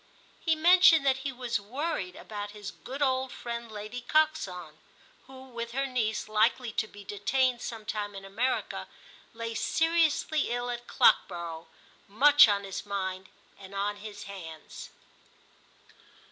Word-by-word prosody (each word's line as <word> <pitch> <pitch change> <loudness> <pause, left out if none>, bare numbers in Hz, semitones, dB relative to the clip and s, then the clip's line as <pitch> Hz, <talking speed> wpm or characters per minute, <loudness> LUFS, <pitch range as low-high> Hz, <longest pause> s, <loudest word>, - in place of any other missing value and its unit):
He 325 -2 +1
mentioned 330 -2 +6
that 265 -1 +3
he 275 0 -3
was 245 -3 -2
worried 215 - -3
about 205 -1 -7
his 205 -1 -6
good 275 +3 -5
old 260 -1 +1
friend 235 -1 -6
Lady 215 +3 -6
Coxon, 225 - 0 0.5
who, 260 0 -12
with 235 -1 -6
her 275 +2 0
niece 220 -5 -1
likely 225 +3 +2
to 220 - -1
be 205 -1 -13
detained 240 +5 0
some 225 -2 -6
time 205 -1 -3
in 195 0 -8
America, 230 +7 -2 0.5
lay 230 0 -4
seriously 320 +2 +1
ill 245 +1 -2
at 240 0 -6
Clockborough, 170 -2 +2 0.4
much 285 +7 +7
on 200 -1 +1
his 195 -1 -5
mind 190 -2 -4 0.3
and 195 0 -11
on 205 +1 -1
his 205 0 -9
hands. 165 -6 -9
230 Hz, 140 wpm, -29 LUFS, 200-265 Hz, 0.5 s, much